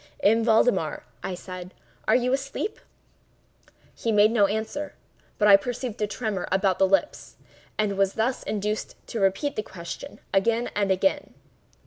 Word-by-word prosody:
"M. 225 +2 +4
Valdemar," 220 -7 +2 0.2
I 185 - -3
said, 180 0 -9 0.3
"are - - +5
you 250 +1 +2
asleep?" 275 +10 -3 1.1
He 230 - -2
made 210 0 +5
no 210 -4 +4
answer, 220 +8 -3 0.4
but 210 - +3
I 200 - +10
perceived 245 0 -5
a 210 - +2
tremor 210 -4 -3
about 190 -1 +2
the 190 - +5
lips, 195 +10 0 0.4
and 200 -2 0
was 195 -1 +3
thus 240 +4 0
induced 210 +1 -3
to 230 - -3
repeat 195 +9 +1
the - - 0
question, 170 -5 -8
again 230 +5 +2
and 200 -1 +1
again. 190 +10 +1
210 Hz, 150 wpm, -26 LUFS, 195-235 Hz, 1.1 s, I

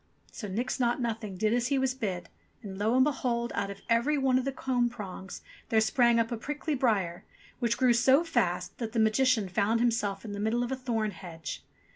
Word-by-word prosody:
So 210 - -6
Nix 235 +8 -2
Naught 240 0 +1
Nothing 220 -5 -3
did 215 +3 +1
as 240 0 +1
he 275 +1 +1
was 265 -1 +1
bid, 200 -9 -4 0.4
and 195 -2 -7
lo 220 +4 +2
and 260 - +6
behold! 245 -4 -1
out 200 0 -2
of 200 0 -8
every 235 +6 +2
one 265 -2 +3
of 260 - -3
the 275 - 0
comb 250 -2 0
prongs 195 -5 -8 0.3
there 220 - +4
sprang 235 +1 +3
up 230 0 0
a 235 - -2
prickly 295 +6 -3
briar, 205 -10 0 0.4
which 235 -2 +1
grew 255 -2 +4
so 260 +6 +5
fast 180 - -1
that 225 -2 -4
the 235 - +1
Magician 220 0 +3
found 200 +5 +1
himself 225 -4 0
in 210 - -6
the 205 - -5
middle 220 +3 +1
of 245 - -4
a - - 0
thorn 230 -5 -1
hedge 165 -4 -8
235 Hz, 215 wpm, -29 LUFS, 205-255 Hz, 0.4 s, and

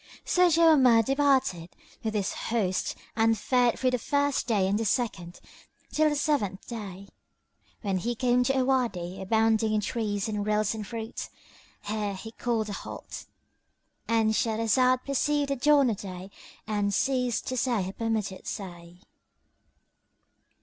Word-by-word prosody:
So 360 0 +4
Jawamard 290 -9 +5
departed 265 - +1 0.3
with 220 -1 -2
his 200 -2 -1
host 205 -5 -1 0.2
and 225 0 +3
fared 245 +2 +2
through 255 -1 +1
the 250 - 0
first 285 +1 0
day 210 -5 +2
and 200 +2 +1
the - - 0
second 200 -6 -2 0.5
till 310 0 +3
the 295 - -1
seventh 270 -11 -1
day, 200 -4 -7 0.8
when 195 -3 0
he 240 +6 -2
came 250 +1 +2
to 270 +1 +1
a 260 - +2
Wady 210 -10 -1
abounding 220 +2 +2
in - - +2
trees 205 -2 -2
and 210 -1 -2
rills 210 0 +1
and 215 -2 -6
fruits. 225 0 -6 0.5
Here 210 -1 -2
he 220 +4 -8
called 225 -2 -2
a - - -4
halt - - -8 0.4
— - - -48
And 225 -1 +2
Shahrazad 230 +4 +2
perceived 285 +1 0
the - - +1
dawn 280 -1 +4
of 210 - -3
day 190 -1 -8 0.3
and 205 -1 0
ceased 250 0 0
to 255 - -2
say 240 -5 0
her 190 +1 -5
permitted 220 -4 -3
say. 175 -2 -8
225 Hz, 150 wpm, -27 LUFS, 205-255 Hz, 0.8 s, Jawamard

